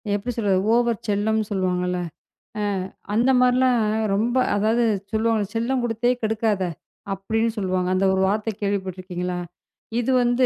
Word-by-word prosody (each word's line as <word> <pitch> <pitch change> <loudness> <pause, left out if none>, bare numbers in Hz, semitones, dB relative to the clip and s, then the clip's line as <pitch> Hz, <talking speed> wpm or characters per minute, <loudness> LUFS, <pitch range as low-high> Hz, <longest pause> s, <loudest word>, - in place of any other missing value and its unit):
எப்படி 210 +5 -3
சொல்றது? 200 -4 +2
ஓவர் 235 -1 +2
செல்லம் 210 +2 +1
சொல்லுவாங்கல்ல. 180 -2 0 0.6
அ - - -1 0.5
அந்தமாரிலாம் 250 +1 +4 0.4
ரொம்ப 235 +5 0 0.2
அதாவது 220 +4 +2 0.3
சொல்லுவாங்க, 220 -1 +1
"செல்லம் 250 +3 0
கொடுத்தே 240 +1 +1
கெடுக்காத!" 215 -3 +1 0.5
அப்பிடின்னு 220 +4 -1
சொல்லுவாங்க. 185 -2 0
அந்த 195 +1 +2
ஒரு 190 - +1
வார்த்தை 215 +3 0
கேள்விப்பட்டிருக்கீங்களா? 185 -2 -3 0.6
இது 245 +2 0
வந்து 245 +1 +3
215 Hz, 120 wpm, -23 LUFS, 190-235 Hz, 0.6 s, அந்தமாரிலாம்